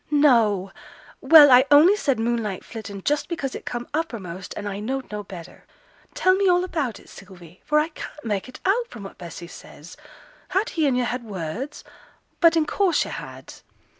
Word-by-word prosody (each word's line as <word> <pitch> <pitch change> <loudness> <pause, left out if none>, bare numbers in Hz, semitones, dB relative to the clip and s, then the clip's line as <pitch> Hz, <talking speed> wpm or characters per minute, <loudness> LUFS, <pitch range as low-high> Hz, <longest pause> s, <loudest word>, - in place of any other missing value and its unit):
'No! 230 -10 +3 0.5
Well, 290 0 +8
I 250 +1 +7
only 305 +7 +7
said 280 -10 0
"moonlight 225 -4 -2
flittin'" 200 -4 -8
just 295 0 -1
because 280 -6 -3
it - - -8
come 240 0 -4
uppermost 195 - -5
and 205 - -5
I 200 0 -4
knowed 260 +4 -4
no 210 0 -4
better. 180 -4 -12 0.5
Tell 370 - +3
me 385 0 +2
all 360 0 +3
about 300 - -3
it, - - -19
Sylvie, 180 -3 -15
for 300 - +1
I 305 +2 +2
can't 300 -2 -10
mak' 205 +1 -2
it 255 - -12
out 460 +5 +1
from 220 - -11
what 195 - -11
Bessy 170 -1 -9
says. 165 -1 -13 0.5
Had 395 +5 0
he 315 -3 0
and 255 -2 +1
yo' 250 - +1
had 245 +1 -3
words? 210 - -6 0.6
but 335 -1 +5
in 315 - +2
course 375 +1 +1
yo' - - -7
had.' - - -9
250 Hz, 190 wpm, -23 LUFS, 200-305 Hz, 0.6 s, Well